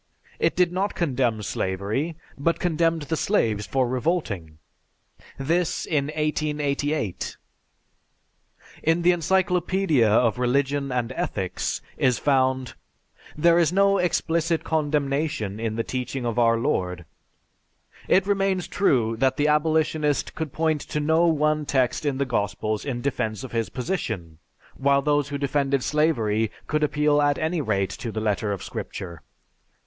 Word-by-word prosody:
It - - +1
did 180 -1 +3
not 195 +3 -1
condemn 125 -9 0
slavery, 100 - -2 0.2
but 165 +4 0
condemned 165 -2 +1
the 160 +3 -2
slaves 110 - 0
for 130 -2 +1
revolting. 120 - -2 0.8
This 165 +5 0
in 145 -4 0
1888! 150 - -2 1.4
In 165 +2 +1
the 180 - +6
"Encyclopedia 180 - +2
of 115 +2 +3
Religion 140 +2 +1
and 125 -1 -1
Ethics" 95 -7 -3
is 125 -2 +2
found: 130 -2 +1 0.6
"There 170 +2 +5
is 165 -2 +3
no 195 +1 +3
explicit 165 -1 0
condemnation 145 -8 -1
in 110 -1 -2
the 115 - -1
teaching 125 +1 -4
of 120 0 -1
our 115 -1 +4
Lord.... 90 - -1 1.0
It 190 0 +4
remains 195 -2 0
true 120 - +1
that 130 +2 +1
the 150 - +2
abolitionist 150 -1 +1
could 160 -3 -4
point 155 -1 0
to 150 - -3
no 160 +3 +3
one 155 -1 +2
text 130 0 0
in 135 -2 0
the 140 - 0
Gospels 105 -2 -2
in 125 -4 -3
defense 110 -4 -2
of 130 - -7
his 115 -1 -1
position, 110 - -4 0.4
while 140 +1 +2
those 145 -1 +1
who 145 - -3
defended 140 -1 0
slavery 115 -9 +1 0.2
could 155 0 -1
appeal 150 0 +2
at 145 -1 +2
any 160 +1 -1
rate 100 -7 0
to 115 - -5
the 110 - -3
letter 105 -1 0
of 100 - -4
Scripture." 85 -4 -6
140 Hz, 140 wpm, -24 LUFS, 115-160 Hz, 1.4 s, the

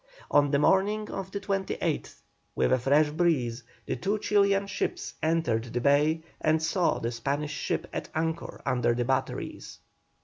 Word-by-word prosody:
On 145 -1 +5
the 140 - +3
morning 205 +7 +2
of 190 -1 -5
the 200 - -4
28th, 195 -1 -2 0.3
with - - +2
a 130 - +3
fresh 145 +4 +3
breeze, 145 -8 +1 0.2
the - - -2
two 200 +4 -1
Chilian 200 -1 +2
ships 200 - -3
entered 155 -9 +1
the 120 0 -3
bay 150 +5 +3 0.2
and 155 +1 +3
saw 170 +2 +1
the 115 - -2
Spanish 140 +6 -2
ship - - -2
at - - -4
anchor 160 +1 -3
under 120 -1 +1
the 120 0 0
batteries. 130 +1 -3
155 Hz, 160 wpm, -28 LUFS, 130-190 Hz, 0.3 s, On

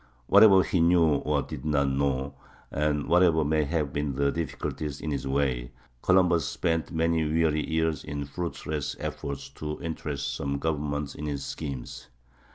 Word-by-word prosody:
Whatever 95 - +7
he 90 - 0
knew 85 -3 +4
or 75 -1 0
did - - -8
not 75 -2 +2
know, 70 0 0 0.4
and 75 0 0
whatever 85 -3 +4
may 75 0 +2
have 75 -2 -1
been 70 -2 -2
the 70 +1 +2
difficulties 75 -3 -4
in 80 - -4
his 70 -1 -3
way, 65 -3 -1 0.3
Columbus 90 -3 +3
spent 80 -2 -1
many 80 0 +1
weary 75 0 +1
years 80 -2 0
in 70 -1 -4
fruitless 75 -1 -4
efforts 70 -1 -5
to 75 +2 -6
interest 75 -4 -4
some 70 0 -2
government 75 -2 -2
in 75 - -6
his 70 -2 -3
schemes. 70 -6 -6
75 Hz, 155 wpm, -27 LUFS, 70-80 Hz, 0.4 s, Whatever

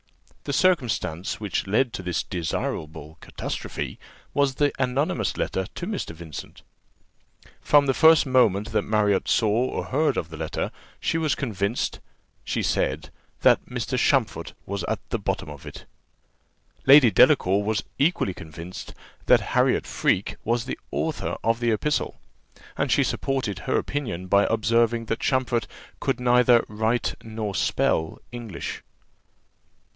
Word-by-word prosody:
The 140 - -2
circumstance 125 - +1
which 105 -2 -2
led 115 +5 +1
to - - -4
this 90 -1 -2
desirable 80 -3 -4
catastrophe - - -5 0.3
was 140 -2 +2
the 145 0 +2
anonymous 130 +4 0
letter 95 0 -1
to 175 - -4
Mr. 195 - -4
Vincent. 80 -4 -9 1.0
From 145 -1 +5
the 135 - +2
first 160 +2 +6
moment 115 -6 +2
that 105 -1 +2
Marriott 105 -2 +1
saw 110 - +3
or 115 +5 0
heard 150 +4 +1
of 80 - -2
the 80 - -8
letter, - - -3 0.3
she 165 - 0
was 155 -3 +1
convinced, 105 -3 -2 0.4
she - - -2
said, - - -1 0.3
that - - +5
"Mr. - - -3
Champfort - - +1
was 100 -2 -4
at - - -3
the - - 0
bottom 75 - -3
of 70 -2 -11
it." - - -10 1.0
Lady 135 -4 +8
Delacour 95 0 +5
was 105 0 -1 0.2
equally 140 - +2
convinced 85 +2 -9 0.3
that - - +4
Harriot - - +3
Freke 95 - 0
was 115 +1 0
the 130 - -5
author 160 -2 -2
of 115 +1 +1
the 120 -1 +1
epistle; 150 +8 -1 0.6
and - - -1
she - - +4
supported 130 -8 -2
her - - 0
opinion 115 -11 -3
by 100 +2 +3
observing, 115 +1 +2
that 115 +1 -2
Champfort 130 -3 0 0.3
could - - -1
neither 125 -1 +4
write 110 +3 0
nor 110 -2 -4
spell 80 -3 0
English. 115 -7 -6
115 Hz, 140 wpm, -25 LUFS, 95-130 Hz, 1.0 s, Lady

